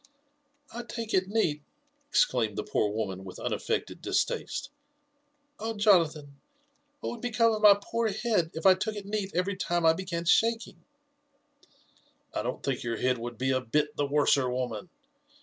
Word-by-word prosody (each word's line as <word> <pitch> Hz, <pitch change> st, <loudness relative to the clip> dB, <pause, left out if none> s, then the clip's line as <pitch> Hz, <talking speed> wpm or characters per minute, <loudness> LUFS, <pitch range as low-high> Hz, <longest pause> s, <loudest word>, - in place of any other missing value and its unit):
''I 240 Hz, -, -4 dB
take 230 Hz, -1 st, -5 dB
it 185 Hz, 0 st, +2 dB
neat!" 180 Hz, -8 st, 0 dB, 0.5 s
exclaimed 115 Hz, -, +2 dB
the -, -, -1 dB
poor 105 Hz, -, 0 dB
woman 100 Hz, -3 st, -3 dB
with 95 Hz, -1 st, -9 dB
unaffected -, -, -3 dB
distaste. -, -, -1 dB, 0.9 s
Oh, 225 Hz, +1 st, -3 dB
Jonathan 160 Hz, -9 st, +3 dB, 0.7 s
I -, -, -5 dB
what -, -, -1 dB
would 235 Hz, -, -8 dB
become 230 Hz, -1 st, +2 dB
of 215 Hz, -, -3 dB
my 205 Hz, -2 st, +8 dB
poor 230 Hz, +3 st, -1 dB
head 210 Hz, -5 st, 0 dB
if 160 Hz, -, -6 dB
I 190 Hz, -, +9 dB
took 210 Hz, +4 st, -3 dB
it 205 Hz, -1 st, -6 dB
neat 205 Hz, -1 st, -2 dB
every 185 Hz, +3 st, 0 dB
time 175 Hz, -2 st, -1 dB
I 160 Hz, -, +7 dB
began 170 Hz, -1 st, -4 dB
shaking 230 Hz, +6 st, +2 dB, 0.5 s
?" 290 Hz, 0 st, -34 dB, 0.2 s
'* -, -, -37 dB
I -, -, -1 dB
don't -, -, -4 dB
think 135 Hz, -3 st, -1 dB
your 115 Hz, -1 st, -3 dB
head 125 Hz, 0 st, +1 dB
would 120 Hz, 0 st, -6 dB
be 130 Hz, +2 st, 0 dB
a 130 Hz, 0 st, +1 dB
bit 150 Hz, +4 st, 0 dB
the 145 Hz, -, 0 dB
worser, 140 Hz, -2 st, +3 dB
woman. 125 Hz, +4 st, -3 dB
175 Hz, 175 wpm, -28 LUFS, 130-215 Hz, 0.9 s, I